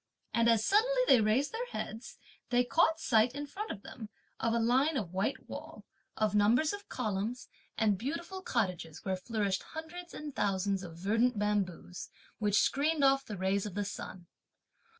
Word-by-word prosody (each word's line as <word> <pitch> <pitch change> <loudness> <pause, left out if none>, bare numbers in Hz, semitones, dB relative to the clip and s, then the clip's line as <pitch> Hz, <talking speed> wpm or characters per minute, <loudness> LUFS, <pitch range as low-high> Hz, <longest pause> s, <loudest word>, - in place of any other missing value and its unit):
And 235 0 +4
as 225 -2 +3
suddenly - - +3
they 245 - +7
raised 225 +7 +2
their 475 +2 -3
heads, 225 - -6 0.3
they 245 0 +4
caught 320 +5 +3
sight, 235 -2 +3
in 290 0 -3
front 410 +9 -6
of 200 - -6
them, 220 -4 -9 0.3
of 230 - +1
a 230 - +2
line 260 +6 +3
of 185 -7 -4
white 195 +8 -1
wall, - - -8 0.3
of 215 -2 +1
numbers 230 - +4
of 405 0 -8
columns, 220 +1 -2 0.3
and 210 -4 +2
beautiful 335 - -4
cottages, 185 - -2
where 190 -1 0
flourished 200 -1 -1
hundreds 340 +2 -8
and 295 -3 -7
thousands 195 -1 0
of 165 -3 -9
verdant 225 +6 +2
bamboos, 200 -4 -2 0.3
which 205 -1 +3
screened 295 +1 +2
off 270 0 +5
the 210 - -6
rays 190 +2 0
of 195 - -8
the 205 0 -1
sun. 190 -2 -7
225 Hz, 170 wpm, -32 LUFS, 200-285 Hz, 0.3 s, they